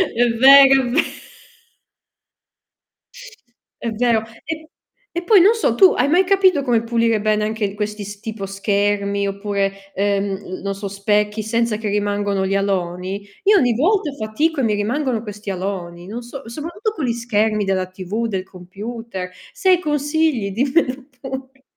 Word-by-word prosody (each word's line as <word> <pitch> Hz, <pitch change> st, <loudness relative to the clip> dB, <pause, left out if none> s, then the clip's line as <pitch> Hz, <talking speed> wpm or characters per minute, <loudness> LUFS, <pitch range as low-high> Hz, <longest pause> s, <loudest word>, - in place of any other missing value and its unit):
È 240 Hz, +1 st, +3 dB
vero, 270 Hz, +3 st, +7 dB
è 245 Hz, -, -2 dB
ve 300 Hz, +7 st, +2 dB, 2.8 s
È 235 Hz, -, -2 dB
vero. 230 Hz, 0 st, +2 dB, 0.2 s
E 315 Hz, 0 st, -6 dB, 0.4 s
e 345 Hz, +1 st, -4 dB
poi 395 Hz, +1 st, +6 dB
non 415 Hz, +6 st, +5 dB
so, 450 Hz, -, +1 dB
tu 380 Hz, -2 st, +6 dB
hai -, -, +3 dB
mai 350 Hz, +6 st, +4 dB
capito 375 Hz, -4 st, +3 dB
come 240 Hz, -4 st, +1 dB
pulire 230 Hz, -1 st, +1 dB
bene 215 Hz, 0 st, +1 dB
anche 215 Hz, -2 st, -2 dB
questi 210 Hz, 0 st, -4 dB
s 205 Hz, +1 st, -9 dB
tipo 220 Hz, -2 st, -6 dB
schermi 200 Hz, 0 st, 0 dB
oppure, 200 Hz, 0 st, -1 dB, 0.2 s
ehm, 195 Hz, -1 st, -1 dB
non 195 Hz, 0 st, -3 dB
so, 200 Hz, +1 st, -5 dB
specchi, 210 Hz, +2 st, 0 dB
senza 230 Hz, 0 st, 0 dB
che 220 Hz, 0 st, -4 dB
rimangono 205 Hz, -1 st, 0 dB
gli 190 Hz, -, -1 dB
aloni? 190 Hz, 0 st, -2 dB, 0.2 s
Io 410 Hz, +1 st, +6 dB
ogni 245 Hz, -9 st, +3 dB
volta 335 Hz, -, +1 dB
fatico 280 Hz, +7 st, -1 dB
e -, -, +1 dB
mi 215 Hz, -3 st, +2 dB
rimangono 235 Hz, +2 st, -1 dB
questi 210 Hz, -1 st, -8 dB
aloni, 180 Hz, -2 st, -4 dB
non 220 Hz, +6 st, -6 dB
so, 245 Hz, +2 st, -9 dB
soprattutto 335 Hz, -, -4 dB
con 310 Hz, -, -2 dB
gli 235 Hz, -, 0 dB
schermi 220 Hz, -3 st, 0 dB
della 190 Hz, -1 st, 0 dB
TV, 190 Hz, +5 st, -4 dB
del 190 Hz, -4 st, -3 dB
computer. 190 Hz, +2 st, -7 dB, 0.2 s
Se 380 Hz, -, 0 dB
hai 365 Hz, -2 st, +5 dB
consigli 295 Hz, -, 0 dB
dimmelo 260 Hz, -, 0 dB
pure. 265 Hz, 0 st, -8 dB
220 Hz, 155 wpm, -20 LUFS, 200-270 Hz, 2.8 s, vero